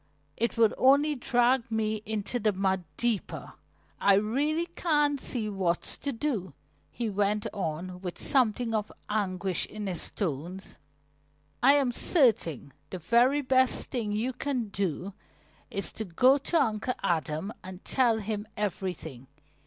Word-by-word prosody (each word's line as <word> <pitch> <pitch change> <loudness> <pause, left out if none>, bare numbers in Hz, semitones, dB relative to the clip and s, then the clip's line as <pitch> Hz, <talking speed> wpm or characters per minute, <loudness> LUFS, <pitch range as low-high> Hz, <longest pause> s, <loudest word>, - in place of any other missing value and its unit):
It 235 +1 -1
would 225 -2 +4
only 280 +3 +5
drag 245 -1 +2
me 220 -1 -1
into 220 +3 -2
the 215 -1 +2
mud 190 -2 0
deeper. 235 -4 -2 0.5
I 200 - +5
really 285 +11 +1
can't 295 -5 +1
see 230 -4 0
what's 190 -4 -1
to 280 - -2
do," 225 - -3 0.3
he 235 -1 -3
went 205 0 0
on 180 0 -4
with 180 -2 -5
something 240 -3 +2
of 210 -1 -1 0.2
anguish 190 -3 -1
in 210 -1 -6
his 185 -3 -3
tones. 180 +1 -5 0.8
"I 275 +3 +7
am 275 -4 +3
certain 220 - +2 0.2
the 185 - -5
very 240 - +3
best 260 -1 +2
thing 225 -5 -2
you 225 +5 -1
can 250 -3 -2
do 195 -1 -3 0.6
is 200 - -4
to 220 - -5
go 255 +10 +4
to 330 +4 +1
Uncle 230 -1 0
Adam 165 +4 -1
and 185 0 -10
tell 240 -4 +3
him 215 0 -4
everything. 180 -10 -4
215 Hz, 140 wpm, -28 LUFS, 190-255 Hz, 0.8 s, I